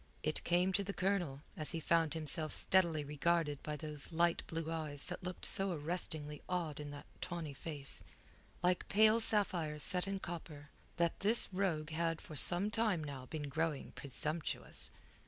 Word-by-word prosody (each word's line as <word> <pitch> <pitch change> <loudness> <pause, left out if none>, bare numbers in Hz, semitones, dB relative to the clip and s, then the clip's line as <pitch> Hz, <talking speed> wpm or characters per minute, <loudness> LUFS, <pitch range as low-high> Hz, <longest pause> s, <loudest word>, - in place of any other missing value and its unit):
It 155 - 0
came 180 +2 +2
to 200 - +2
the 200 +1 -3
Colonel, 175 -8 0
as 155 - +1
he 165 - -1
found 165 -1 +2
himself 155 0 +1
steadily 170 -5 +3
regarded 150 0 +1
by 150 - -3
those 150 0 -2
light 170 +1 +3
blue 165 0 -3
eyes 150 -3 -2
that - - -5
looked 180 -1 -4
so 195 -1 +4
arrestingly 150 -2 -3
odd 170 -5 -1
in 145 -1 -5
that 145 0 -8 0.2
tawny 170 -5 -4
face 145 -1 -5 0.6
like 180 0 +2
pale 215 +2 +6
sapphires 175 -9 +1
set 180 +1 +3
in 195 0 -1
copper 155 -5 -7 0.3
that 170 -1 +1
this 210 0 +5
rogue 165 -5 0
had 165 0 0
for 155 - -9
some 180 +8 +4
time 215 -7 +2
now 135 -3 -6
been 150 0 -4
growing 155 0 -1
presumptuous. 150 +4 -4
165 Hz, 165 wpm, -36 LUFS, 150-180 Hz, 0.6 s, pale